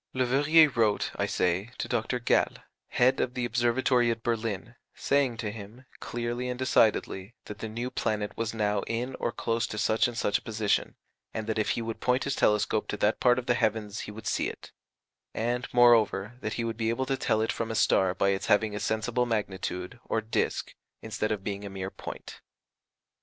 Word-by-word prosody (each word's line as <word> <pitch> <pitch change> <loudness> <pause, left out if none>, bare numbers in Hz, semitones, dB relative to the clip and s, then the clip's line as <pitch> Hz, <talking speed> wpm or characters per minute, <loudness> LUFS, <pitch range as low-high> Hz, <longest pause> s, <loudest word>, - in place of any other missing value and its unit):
Leverrier 145 +5 +5
wrote, 110 -3 +2
I - - 0
say, 90 +5 0
to - - -3
Dr. 120 +1 -1
Galle, 120 - +2 0.3
head 130 +2 +3
of 125 - -1
the 125 -1 -1
Observatory 120 +1 +2
at 115 0 -2
Berlin, 115 -1 -2 0.2
saying 140 -4 +1
to 110 -2 -3
him, 110 +4 -11
clearly 120 +1 -3
and 125 - -3
decidedly, 110 -4 +1
that 105 -1 -8
the 110 - -5
new 120 +3 -4
planet 105 -1 -2
was 115 -1 -2
now 105 -2 0
in 120 +3 -2
or 120 - -1
close 115 -1 -1
to 110 - -6
such 110 +3 +2
and 120 -1 -6
such 105 -2 +1
a - - -23
position, 110 -2 -1 0.4
and 110 - -2
that 110 0 -1
if 105 - 0
he 115 - -2
would 115 0 -5
point 125 +1 +1
his 140 - -1
telescope 105 0 +2
to 105 - -3
that 105 +2 +1
part 125 -1 +4
of 125 - -3
the 125 - +3
heavens 110 -2 -1
he - - -6
would 110 +1 -10
see - - 0
it; - - -11 0.6
and, 120 +2 -1
moreover, 115 -4 +4
that 110 - -3
he 120 - -2
would 115 -1 -3
be 115 -1 0
able 130 +3 0
to 135 - 0
tell 110 -4 +1
it 110 - +1
from 115 - -3
a 115 - -3
star 95 -2 +3
by 100 - +2
its 95 0 -1
having 105 -1 +3
a - - -3
sensible 115 +3 0
magnitude, 95 -2 -3
or 110 - 0
disk, 110 +1 -2 0.3
instead 110 -1 -2
of 105 -3 -2
being 100 0 -4
a 100 - -5
mere 95 0 -5
point. - - -9
115 Hz, 205 wpm, -28 LUFS, 105-120 Hz, 0.6 s, Leverrier